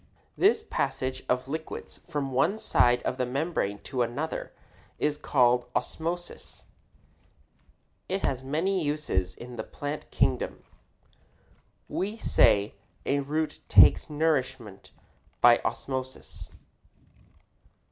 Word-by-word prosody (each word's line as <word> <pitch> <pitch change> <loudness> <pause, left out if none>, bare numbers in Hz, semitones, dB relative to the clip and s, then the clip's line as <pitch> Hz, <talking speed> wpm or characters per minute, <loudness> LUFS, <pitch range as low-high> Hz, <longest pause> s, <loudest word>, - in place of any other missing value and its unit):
This 435 +3 +3
passage 130 -1 -2
of 125 +1 +1
liquids 160 +3 -6
from 145 -4 -2
one 155 +11 +2
side 125 - +3
of 130 - -2
a - - +2
membrane 135 - -1
to 130 -3 -2
another 125 +7 -3 0.5
is 150 0 +1
called 125 -4 +2
osmosis. 175 +2 -4 1.4
It 195 +1 -1
has 130 -1 -1
many 165 +7 0
uses 120 -12 -1
in 120 0 -10
the - - -3
plant 145 +1 -6
kingdom. - - 0 1.2
We 205 +4 -3
say 100 - +3 0.3
a 140 +1 +1
root 150 +2 -2
takes - - +7
nourishment 130 -9 -1 0.5
by - - +7
osmosis. 130 -1 -4
140 Hz, 105 wpm, -28 LUFS, 125-160 Hz, 1.4 s, takes